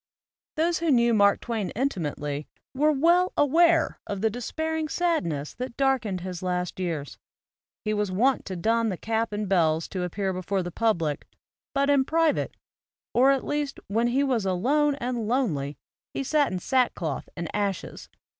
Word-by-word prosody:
Those 335 +2 +1
who 335 - 0
knew 235 -3 +4
Mark 200 -2 +4
Twain 225 -5 -2
intimately 150 - -2 0.3
were 300 +3 +3
well 340 +5 +3
aware 330 +3 +4
of 200 -2 -4
the 220 0 +2
despairing 315 +6 -3
sadness 175 - -1
that 250 -1 -6
dark 270 -2 +3
ened 185 -4 -3
his 180 -1 -5
last 180 0 -2
years. 165 -6 -3 0.7
He 215 - +1
was 210 -2 -1
wont 250 +8 +2
to 190 - -5
don 225 +5 +1
the 185 - -3
cap 225 +3 -1
and 210 0 -2
bells 165 -4 +2
to 185 - -3
appear 190 +2 -2
before 185 +1 -2
the 175 - -5
public; 170 -8 0 0.5
but 280 0 +2
in 285 -2 +4
private, 320 +2 +1 0.6
or 260 +3 +5
at 275 -1 +2
least 295 -1 -2
when 225 +4 +2
he 260 +4 +2
was 255 -6 +1
alone 275 +11 +2
and 245 -4 -3
lonely 165 - 0 0.4
he - - -1
sat 290 +1 +2
in 185 - -2
sackcloth 180 - 0
and 170 -1 -3
ashes. 200 -3 -3
225 Hz, 165 wpm, -26 LUFS, 185-275 Hz, 0.7 s, or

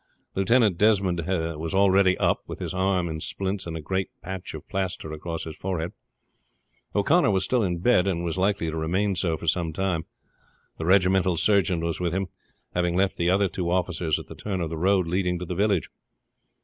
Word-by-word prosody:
Lieutenant 105 -1 +3
Desmond 100 -5 +3
was 80 -2 -2
already 95 -1 +4
up, - - +2
with - - -6
his - - -4
arm 95 -1 +1
in 80 -1 -4
splints 95 +1 -3
and 80 -1 -4
a - - -6
great 95 +4 -2
patch 95 -2 -6
of 80 - -10
plaster 95 -5 -3
across 80 +1 -5
his 80 -1 -7
forehead. 90 -3 -3 1.0
O'Connor 140 - +4
was 95 -2 +2
still 125 +6 +1
in 90 -4 0
bed, 95 0 +3
and 85 -3 -1
was 85 -2 -2
likely 95 -3 0
to - - -5
remain 95 +5 0
so 85 -2 0
for - - -8
some 85 0 +1
time. 90 -1 -1 0.7
The 80 - -3
regimental 95 -1 +3
surgeon 95 -3 +2
was 85 0 -2
with 85 -2 -1
him, 95 0 -1 0.4
having 90 -1 0
left 95 +1 +2
the 85 0 +1
other 100 +2 +3
two 90 -1 -3
officers 90 -3 0
at - - -8
the - - -10
turn 100 -3 -4
of 85 -2 -3
the - - -2
road 95 +1 +3
leading 90 +1 0
to 90 - -5
the 90 - -4
village. 100 -1 +1
90 Hz, 200 wpm, -25 LUFS, 85-95 Hz, 1.0 s, already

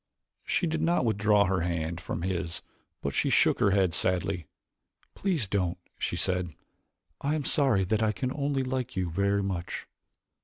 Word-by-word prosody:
She - - 0
did 160 -1 -1
not 165 -4 +2
withdraw 105 -1 +3
her 95 0 +1
hand 85 0 -2
from 85 0 -4
his 90 -2 -2 0.4
but 70 - -1
she - - +1
shook - - +4
her - - +4
head 95 -3 +2
sadly. 90 -3 0 0.7
"Please 170 - 0
don't," 90 -3 0 0.2
she - - -1
said. 90 -4 0 0.7
"I 145 +2 0
am 150 -3 -2
sorry 130 -10 +3
that 110 +3 +1
I 110 -1 +3
can 130 +5 -3
only 140 -2 0
like 130 -1 -3
you 90 -3 -1
very 100 +3 +1
much." 90 -3 -3
100 Hz, 165 wpm, -28 LUFS, 90-130 Hz, 0.7 s, shook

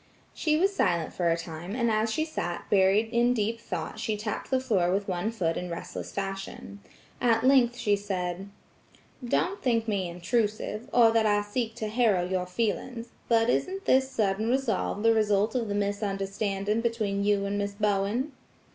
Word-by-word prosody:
She 305 -1 +1
was 390 +4 +2
silent 170 - +1
for 175 -2 +1
a 165 - +2
time 165 +4 -6
and 235 -2 +1
as 220 +1 +1
she 310 +6 0
sat 175 - -4
buried 200 +2 +4
in 240 +1 +3
deep 225 +1 -1
thought - - -5
she 215 -1 -1
tapped 210 0 -4
the 260 - +2
floor 200 -9 +1
with 195 +1 0
one 185 +2 -1
foot 180 -8 -1
in 180 - -4
restless 170 - -6
fashion. 195 - -5 0.4
At 230 -2 +3
length 255 -2 +4
she 210 -4 +2
said: 190 -1 -4 0.7
"Don't 360 +10 0
think 230 -3 +1
me 195 -4 -1
intrusive, 210 +5 -2
or 230 -2 +6
that 225 -1 +3
I 205 0 +2
seek 225 +2 -3
to 220 -2 -3
harrow 215 -5 +2
your 180 -1 -1
feelings, 230 +4 -2 0.2
but 225 -1 +4
isn't 380 +9 -1
this 265 0 +3
sudden 215 -2 0
resolve 235 -5 0
the 230 0 +5
result 210 -1 +2
of 240 -3 -1
the 205 - -2
misunderstanding 200 +1 -1
between 215 -4 -1
you 200 -1 +2
and 200 +1 -1
Miss 200 0 -2
Bowen?" 210 +6 0
210 Hz, 175 wpm, -28 LUFS, 195-235 Hz, 0.7 s, or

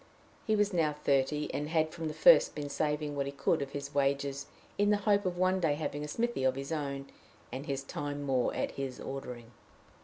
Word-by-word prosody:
He 220 - +3
was 205 -1 +2
now 160 -4 +2
thirty, 150 0 0
and 150 +1 -2
had 160 -1 +1
from 165 -2 -4
the 155 - -4
first - - +6
been 145 -1 -4
saving 150 0 -1
what 140 -1 -1
he - - -3
could 140 +3 +1
of 140 - -3
his 140 0 -5
wages 140 0 0 0.3
in 205 0 +4
the 210 - +4
hope 205 -2 +3
of 175 -1 -2
one 185 +1 +2
day 160 -5 +2
having 150 -1 -3
a - - -4
smithy 235 - -1
of 130 0 +3
his 135 +2 -5
own, 140 -3 -3 0.5
and 135 +4 -6
his 135 -1 -2
time 145 +1 -4
more 130 -3 +1
at - - -1
his 135 -2 -5
ordering. 125 -4 -7
145 Hz, 215 wpm, -31 LUFS, 140-160 Hz, 0.5 s, first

